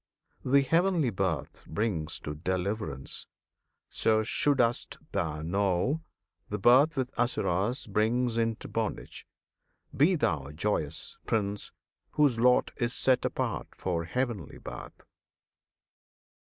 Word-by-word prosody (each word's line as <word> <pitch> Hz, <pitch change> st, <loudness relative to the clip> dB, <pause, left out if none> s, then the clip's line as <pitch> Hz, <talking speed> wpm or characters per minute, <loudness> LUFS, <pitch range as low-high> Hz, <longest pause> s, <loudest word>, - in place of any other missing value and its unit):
[FN#32] 125 Hz, -, -4 dB
The 140 Hz, -, +7 dB
Heavenly 165 Hz, 0 st, +2 dB
Birth 95 Hz, -5 st, -2 dB
brings 80 Hz, -4 st, -1 dB
to 75 Hz, -, -4 dB
deliverance, 90 Hz, -, -3 dB, 0.6 s
So 110 Hz, -1 st, +2 dB
should'st 120 Hz, +1 st, +1 dB
thou 80 Hz, -6 st, -2 dB
know! 100 Hz, -, +1 dB, 0.5 s
The 105 Hz, -, -2 dB
birth 135 Hz, +9 st, +5 dB
with 130 Hz, -1 st, -1 dB
Asuras 120 Hz, 0 st, 0 dB
Brings 115 Hz, +3 st, +1 dB
into 115 Hz, -1 st, -1 dB
bondage. -, -, -4 dB, 0.7 s
Be 160 Hz, +7 st, +4 dB
thou 75 Hz, -, 0 dB
joyous, 80 Hz, -4 st, -2 dB
Prince! 105 Hz, -2 st, -1 dB, 0.4 s
Whose 140 Hz, -6 st, +3 dB
lot 125 Hz, +1 st, +4 dB
is 120 Hz, 0 st, 0 dB
set 130 Hz, -1 st, +3 dB
apart -, -, -3 dB
for 85 Hz, -3 st, -2 dB
heavenly 115 Hz, -, -3 dB
Birth. -, -, -9 dB
110 Hz, 110 wpm, -29 LUFS, 90-125 Hz, 0.7 s, The